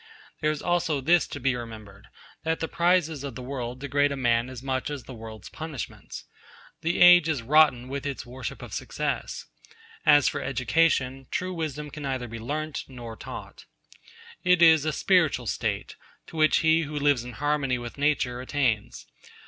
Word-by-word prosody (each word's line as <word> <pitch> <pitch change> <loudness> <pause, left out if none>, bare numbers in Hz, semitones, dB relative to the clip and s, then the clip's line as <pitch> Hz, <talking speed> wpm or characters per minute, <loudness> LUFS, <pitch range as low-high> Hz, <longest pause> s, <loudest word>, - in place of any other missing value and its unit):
There 155 - +1
is 155 -1 -3
also 170 -4 +1
this 165 +6 +3
to 145 - -7
be 130 -1 +1
remembered 110 -4 -9 0.4
that 160 0 0
the 160 - -2
prizes 170 -5 +1
of 140 -4 -6
the 130 - -7
world 125 -1 -5
degrade 145 +1 +1
a - - -2
man 120 -1 +1
as 130 -1 -9
much 130 0 -2
as 145 -4 -5
the 130 - -10
world's 110 -2 -9
punishments. 155 -5 -7 0.6
The 170 +2 0
age 175 -2 +8
is 140 -7 -1
rotten 140 -2 +4
with 140 +1 -4
its 140 - -5
worship 125 +1 -7
of - - -9
success. - - -3 0.6
As 145 -2 +6
for - - -1
education, 135 0 +1
true 185 0 -2
wisdom 150 -3 -4
can 150 - -8
neither 130 -3 -3
be 115 0 -7
learnt 155 +6 -4
nor 120 -4 -9
taught. - - -9 0.8
It 180 -1 +4
is 160 -3 +6
a 155 - +1
spiritual 160 -6 +2
state, - - -3 0.3
to - - -13
which 155 -1 +4
he 160 +1 +4
who 150 -1 -4
lives 145 -4 +2
in 125 0 -8
harmony 145 -1 0
with 120 +2 -8
nature 135 -4 +1
attains. 125 - -1
140 Hz, 175 wpm, -26 LUFS, 125-155 Hz, 0.8 s, age